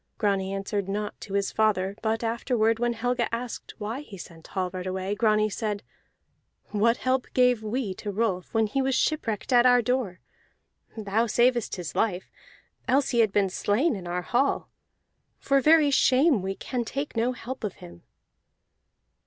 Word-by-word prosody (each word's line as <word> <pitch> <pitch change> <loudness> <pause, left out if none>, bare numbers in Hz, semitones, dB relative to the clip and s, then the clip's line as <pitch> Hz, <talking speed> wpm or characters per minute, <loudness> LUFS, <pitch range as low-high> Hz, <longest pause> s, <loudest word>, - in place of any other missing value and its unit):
Grani 195 -3 0
answered 195 0 -3
naught 210 +1 -4
to 200 - -6
his 200 0 0
father, 200 -3 +1
but 225 +1 -1
afterward 230 -1 +1
when 240 0 +1
Helga 240 +1 -1
asked 235 +1 -5
why 220 +5 -4
he 215 -9 -11
sent 165 -2 -11
Hallvard 185 -1 -3
away, 190 +1 -2
Grani 215 0 +2
said, 210 -1 -3 0.9
"What 225 +3 +2
help 255 0 0
gave 250 -3 +4
we 220 -1 -2
to 210 - -5
Rolf 200 -3 -1
when 225 -1 +2
he 270 +6 -1
was 265 -1 +1
shipwrecked 255 -7 -1
at 245 0 +6
our 245 -1 +5
door? 240 -6 -1 0.8
Thou 220 +2 0
savedst 240 +1 +2
his 175 -4 -6
life, 190 -5 -1 0.6
else 275 +1 +2
he 240 - +1
had 220 -3 +4
been 195 -2 +1
slain 220 - +1
in 180 -3 -7
our 180 +1 -2
hall. 255 +7 0 0.7
For 275 0 +2
very 305 0 +5
shame 270 - +4
we 190 +1 -3
can 245 +3 -3
take 275 +5 -4
no 235 +3 +1
help 255 0 -7
of 210 - -2
him." 85 0 -13
220 Hz, 165 wpm, -26 LUFS, 195-245 Hz, 0.9 s, at